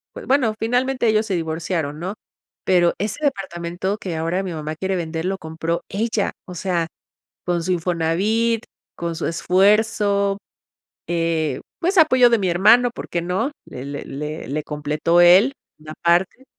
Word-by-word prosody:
B -, -, -8 dB
bueno, 260 Hz, -5 st, +3 dB
finalmente 245 Hz, +2 st, +1 dB
ellos 215 Hz, 0 st, +3 dB
se 195 Hz, -4 st, -1 dB
divorciaron, 160 Hz, -2 st, -2 dB
¿no?, 185 Hz, +4 st, -4 dB, 0.5 s
pero 175 Hz, -2 st, +4 dB
ese 210 Hz, +7 st, -3 dB
departamento 190 Hz, -4 st, -2 dB
que 180 Hz, -5 st, -5 dB
ahora 165 Hz, +4 st, -1 dB
mi 185 Hz, -3 st, -4 dB
mamá 155 Hz, 0 st, -4 dB
quiere 190 Hz, +3 st, -2 dB
vender 165 Hz, -1 st, -3 dB
lo 190 Hz, +1 st, -1 dB
compró 160 Hz, +1 st, -3 dB
ella, 220 Hz, +1 st, -1 dB
o 180 Hz, -, -9 dB
sea, 175 Hz, -2 st, -1 dB, 0.6 s
con 175 Hz, -1 st, 0 dB
su 185 Hz, -, 0 dB
Infonavit, 185 Hz, +7 st, +1 dB, 0.3 s
con 170 Hz, -1 st, -4 dB
su 165 Hz, -, -3 dB
esfuerzo, 200 Hz, +3 st, +2 dB, 0.7 s
eh, 165 Hz, -5 st, 0 dB, 0.2 s
pues, 365 Hz, +2 st, +1 dB
apoyo 255 Hz, -6 st, +6 dB
de 235 Hz, -, +4 dB
mi 190 Hz, -2 st, 0 dB
hermano, 220 Hz, +8 st, +5 dB
por -, -, -8 dB
qué 170 Hz, -, -1 dB
no, 185 Hz, -, -1 dB
le 130 Hz, +1 st, -8 dB
le 140 Hz, 0 st, -6 dB
le 150 Hz, +3 st, -6 dB
le 150 Hz, +2 st, -2 dB
completó 150 Hz, +3 st, +1 dB
él 185 Hz, +10 st, +7 dB, 0.3 s
una 155 Hz, 0 st, -10 dB
parte. 175 Hz, +9 st, +2 dB
180 Hz, 160 wpm, -21 LUFS, 165-215 Hz, 0.7 s, él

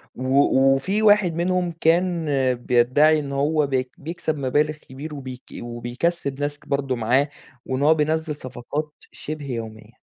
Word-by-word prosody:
و 130 Hz, +1 st, +2 dB, 0.2 s
وفي 195 Hz, +10 st, -1 dB
واحد 205 Hz, -5 st, +5 dB
منهم 180 Hz, 0 st, 0 dB
كان 170 Hz, 0 st, +2 dB, 0.3 s
بيدّعي 125 Hz, +6 st, +3 dB
إنه 140 Hz, -1 st, -5 dB
هو 150 Hz, +1 st, +1 dB
بيك 130 Hz, -1 st, -1 dB
بيكسب 155 Hz, 0 st, -4 dB
مبالغ 145 Hz, +3 st, +1 dB
كبير 150 Hz, +1 st, -9 dB
وبيك 130 Hz, -2 st, -8 dB, 0.2 s
وبيكسِّب 130 Hz, +5 st, -3 dB
ناس 145 Hz, 0 st, -2 dB
برضه 140 Hz, -2 st, -1 dB
معاه، 125 Hz, +5 st, +2 dB, 0.4 s
وإن 130 Hz, +1 st, -2 dB
هو 155 Hz, +2 st, +6 dB
بينزّل 155 Hz, 0 st, 0 dB
صفقات 145 Hz, +4 st, -5 dB, 0.2 s
شبه 155 Hz, -1 st, -7 dB
يومية، 110 Hz, -2 st, -7 dB
145 Hz, 135 wpm, -23 LUFS, 130-160 Hz, 0.4 s, هو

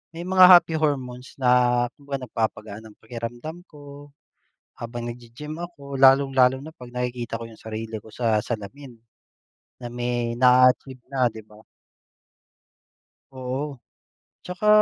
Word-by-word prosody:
may 170 Hz, +1 st, -6 dB
mga 185 Hz, 0 st, +7 dB
happy 165 Hz, -, -8 dB
hormones 130 Hz, -4 st, -3 dB
na 125 Hz, -1 st, +3 dB
kumbaga 140 Hz, -2 st, -6 dB
nagpapagaan 110 Hz, -2 st, -3 dB
ng 105 Hz, -, -15 dB
pakiramdam 120 Hz, +8 st, -7 dB
ko, 145 Hz, -1 st, -13 dB, 0.7 s
habang 120 Hz, 0 st, -6 dB
naggi-gym 120 Hz, +6 st, -8 dB
ako. 140 Hz, -6 st, -8 dB
Lalong-lalo 135 Hz, -1 st, +5 dB
na 155 Hz, +3 st, -10 dB
'pag 125 Hz, -1 st, -12 dB
nakikita 120 Hz, -2 st, -4 dB
ko 115 Hz, -, -7 dB
yung 115 Hz, -, -14 dB
sarili 110 Hz, 0 st, -6 dB
ko 110 Hz, -, -14 dB
sa 110 Hz, -2 st, +1 dB
salamin, 120 Hz, +4 st, -7 dB, 0.9 s
na -, -, -4 dB
may 120 Hz, -1 st, -2 dB
na-a-achieve 125 Hz, 0 st, +4 dB
na, 130 Hz, -2 st, +2 dB
'di 110 Hz, -1 st, -11 dB
ba? 105 Hz, 0 st, -17 dB, 1.7 s
Oo. 130 Hz, +1 st, -5 dB, 0.7 s
Tsaka 180 Hz, +4 st, -4 dB
125 Hz, 125 wpm, -24 LUFS, 120-140 Hz, 1.7 s, mga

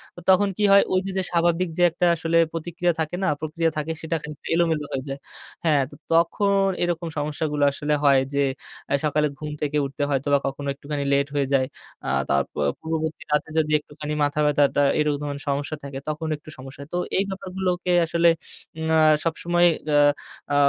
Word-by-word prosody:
তো -, -, -9 dB
তখন 195 Hz, +2 st, +5 dB
কি 210 Hz, -, 0 dB
হয় 200 Hz, 0 st, +7 dB
ওই 185 Hz, -, +4 dB
যে 195 Hz, -, -3 dB
যে 190 Hz, -, +1 dB
স্বাভাবিক 170 Hz, +1 st, +2 dB
যে 175 Hz, -, +3 dB
একটা 175 Hz, +2 st, 0 dB
আসলে 165 Hz, 0 st, 0 dB, 0.2 s
প্রতিক্রিয়া 175 Hz, +1 st, -1 dB
থাকে 160 Hz, +2 st, -2 dB
না, -, -, +2 dB
প্রক্রিয়া 160 Hz, +1 st, 0 dB
থাকে 155 Hz, +1 st, -2 dB
সেটা 165 Hz, +1 st, -2 dB
খানিক 150 Hz, -1 st, -8 dB, 0.2 s
এলোমেলো 165 Hz, -3 st, +1 dB
হয়ে 130 Hz, -, -2 dB
যায়। 135 Hz, +1 st, -5 dB, 0.5 s
হ্যাঁ, 150 Hz, -4 st, +4 dB
তো -, -, -11 dB, 0.2 s
তখন 195 Hz, +4 st, +3 dB, 0.2 s
এরকম 175 Hz, -1 st, -1 dB
সমস্যাগুলো 150 Hz, 0 st, -1 dB
আসলে 150 Hz, +2 st, -2 dB
হয় 140 Hz, -2 st, +5 dB
যে, 140 Hz, -, +2 dB, 0.5 s
আ -, -, +2 dB
সকালে 150 Hz, 0 st, +2 dB
ঘুম 150 Hz, -1 st, -5 dB
থেকে 150 Hz, 0 st, 0 dB
উঠতে 140 Hz, +1 st, -4 dB
হয়তোবা 140 Hz, +1 st, +2 dB
কখনো 140 Hz, +1 st, -5 dB
একটুখানি 140 Hz, 0 st, -4 dB
লেট 140 Hz, +1 st, +1 dB
হয়ে 140 Hz, -1 st, +1 dB
যায়। 130 Hz, -1 st, +2 dB, 0.4 s
আ -, -, 0 dB, 0.2 s
তার 70 Hz, 0 st, +3 dB
পূ -, -, -15 dB, 0.2 s
পূর্ববর্তী 160 Hz, 0 st, -3 dB
রাতে 150 Hz, +1 st, +1 dB
যদি 155 Hz, -1 st, 0 dB
একটুখানি 150 Hz, 0 st, -7 dB
মাথা 145 Hz, +1 st, 0 dB
ব্যথাটা 145 Hz, -1 st, +3 dB, 0.2 s
এরকম 150 Hz, -1 st, 0 dB, 0.2 s
সমস্যা 145 Hz, +2 st, -1 dB
থাকে 140 Hz, -1 st, -6 dB
তখন 155 Hz, +1 st, -3 dB
একটু 150 Hz, -, -15 dB
সমস্যা 135 Hz, +2 st, -10 dB
হয়। 140 Hz, -, -15 dB
তো -, -, +1 dB, 0.2 s
এই 195 Hz, -, +3 dB
ব্যাপারগুলোকে 185 Hz, -1 st, -2 dB
আসলে 170 Hz, +1 st, +3 dB, 0.5 s
উম 160 Hz, 0 st, -3 dB
আ -, -, +5 dB, 0.3 s
সবসময় 175 Hz, +1 st, +2 dB, 0.3 s
আ -, -, +6 dB, 0.6 s
আ -, -, +3 dB
155 Hz, 190 wpm, -24 LUFS, 145-170 Hz, 0.6 s, হয়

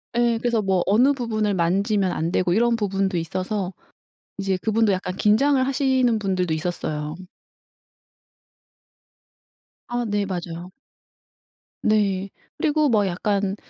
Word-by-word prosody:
어 240 Hz, -, +2 dB
예. 235 Hz, -1 st, +2 dB
그래서 235 Hz, -2 st, +1 dB
뭐 190 Hz, -3 st, +1 dB
어느 245 Hz, +8 st, +4 dB
부분을 215 Hz, -5 st, -1 dB
만지면 190 Hz, +3 st, +1 dB
안 165 Hz, 0 st, -2 dB
되고 180 Hz, -1 st, +1 dB
이런 235 Hz, +2 st, +3 dB
부분도 195 Hz, -3 st, -1 dB
있어서 185 Hz, +3 st, -3 dB, 0.7 s
이제 195 Hz, -1 st, -1 dB
그분도 220 Hz, -1 st, +2 dB
약간 185 Hz, -1 st, -3 dB
긴장을 260 Hz, +7 st, +3 dB
하시는 260 Hz, -4 st, +2 dB
분들도 185 Hz, -5 st, -1 dB
있었어요. 155 Hz, -2 st, -3 dB, 2.7 s
아 240 Hz, -1 st, -2 dB
네 205 Hz, -2 st, 0 dB
맞아요. 175 Hz, -1 st, -6 dB, 1.1 s
네. 200 Hz, -3 st, +1 dB, 0.3 s
그리고 305 Hz, -1 st, +2 dB
뭐 215 Hz, -4 st, +3 dB
약간 195 Hz, +2 st, -1 dB
200 Hz, 250 characters per minute, -23 LUFS, 185-230 Hz, 2.7 s, 어느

